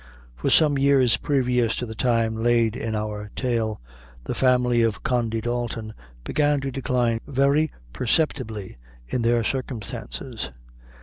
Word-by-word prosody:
For - - -1
some 145 -3 +4
years 135 -5 +4
previous 125 -5 +1
to 125 - -3
the 110 - -7
time 115 -1 +1
laid 115 0 +2
in 110 -1 -3
our 105 -1 -4
tale, 115 -4 -1 0.4
the - - -3
family 125 -2 +3
of 115 -3 0
Condy 120 -5 0
Dalton 120 -2 -3 0.3
began 145 - +1
to 135 0 -3
decline 125 -3 0
very 140 +2 +2 0.2
perceptibly 115 - -1 0.3
in 125 - -1
their 115 0 +2
circumstances. 120 - -4
120 Hz, 130 wpm, -24 LUFS, 110-130 Hz, 0.4 s, some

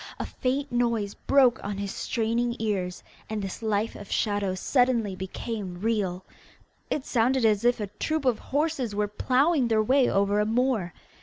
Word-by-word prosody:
a - - -3
faint 275 +3 -2
noise 235 -4 0
broke 260 -3 +3
on 200 -1 -4
his 200 -1 -4
straining 235 +1 -1
ears, 190 -5 -2 0.3
and 215 0 -2
this 195 +2 -5
life 215 0 0
of 205 - -10
shadows 205 -3 0
suddenly 245 -6 +2
became 190 0 -5
real. 195 -4 -1 0.6
It 280 - -2
sounded 250 +1 +2
as 210 -1 +3
if 245 0 +3
a 210 - -1
troop 300 +9 -3
of 250 -4 +2
horses 285 -6 -1
were 210 0 +1
ploughing 260 +6 +2
their 220 -1 +2
way 260 +3 +3
over 200 +1 +2
a 210 - +2
moor. 230 -6 +1
225 Hz, 165 wpm, -27 LUFS, 205-250 Hz, 0.6 s, broke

